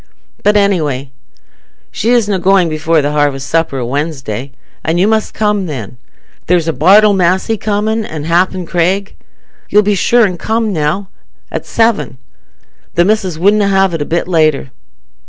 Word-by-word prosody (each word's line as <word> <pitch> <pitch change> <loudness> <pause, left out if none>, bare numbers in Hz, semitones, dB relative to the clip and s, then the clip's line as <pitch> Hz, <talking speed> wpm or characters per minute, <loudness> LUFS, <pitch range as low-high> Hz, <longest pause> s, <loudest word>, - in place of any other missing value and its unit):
But, 210 0 +3
anyway, 150 -10 0 0.8
she 225 - -2
isna 210 -5 +2
going 185 -2 +3
before 155 0 0
the 145 - -1
harvest 145 -2 0
supper 165 -4 0
o' 125 - -3
Wednesday, 135 -3 -4 0.3
and 165 +2 0
you 190 - +3
must 220 0 0
come 210 -3 0
then. 125 -6 -7 0.5
There's 175 -2 +1
Bartle 200 +9 +5
Massey 190 +4 +1
comin', 215 +1 -1
an' 155 -7 -6
happen 180 +3 0
Craig. 185 +4 -1 0.6
You'll 210 +1 +4
be 205 +1 +1
sure 235 +4 +3
an' 180 -4 -3
come, 220 -1 -1
now, 160 +5 -2 0.4
at - - -5
seven? 225 - 0 0.8
The 175 - +3
missis 190 -5 0
wunna 200 +4 +2
have 195 -2 +2
it 165 - -3
a - - -1
bit 170 +3 -2
later." 155 -6 +1
180 Hz, 155 wpm, -13 LUFS, 155-205 Hz, 0.8 s, Bartle